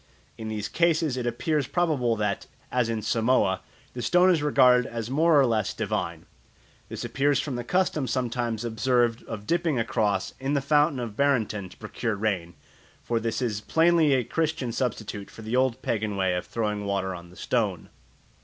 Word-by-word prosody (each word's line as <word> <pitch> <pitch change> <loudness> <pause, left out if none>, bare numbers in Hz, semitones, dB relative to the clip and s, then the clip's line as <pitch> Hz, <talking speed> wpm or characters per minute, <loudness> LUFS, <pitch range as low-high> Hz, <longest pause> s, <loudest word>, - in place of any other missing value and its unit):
In 110 - -7
these 105 -1 -3
cases 165 -4 +1
it 125 -1 -2
appears 140 +4 0
probable 145 -10 +1
that, 105 -1 -2 0.2
as 125 -2 +1
in 110 -2 -2
Samoa, 110 -4 +2 0.3
the 125 - -5
stone 180 +9 +4
is 165 -4 +2
regarded 125 -4 +4
as 115 0 -5
more 155 +2 +4
or 135 - +5
less 110 -4 0
divine. - - -3 0.6
This - - -5
appears 140 0 +1
from 145 - -3
the 120 - -3
custom 155 -2 0
sometimes 120 -2 -2
observed 120 0 +1
of 105 -2 -7
dipping 170 -2 +1
a 115 - +1
cross 105 -4 0
in 135 +2 -1
the - - +3
Fountain 145 0 +2
of 115 -4 -5
Barenton 110 -8 0
to - - -16
procure 110 +1 -3
rain, 95 -5 -2 0.5
for 115 -1 0
this 115 +2 -2
is 105 -3 -2
plainly 165 +2 +3
a 130 -2 +2
Christian 160 -2 -1
substitute 110 -4 -3
for 110 - -12
the 110 +3 -2
old 130 -2 +1
pagan 110 -2 -1
way 95 -1 +1
of 90 - -3
throwing 105 -3 -2
water 100 -1 -1
on 85 -1 -10
the 90 - -16
stone. - - -1
120 Hz, 180 wpm, -26 LUFS, 110-140 Hz, 0.6 s, or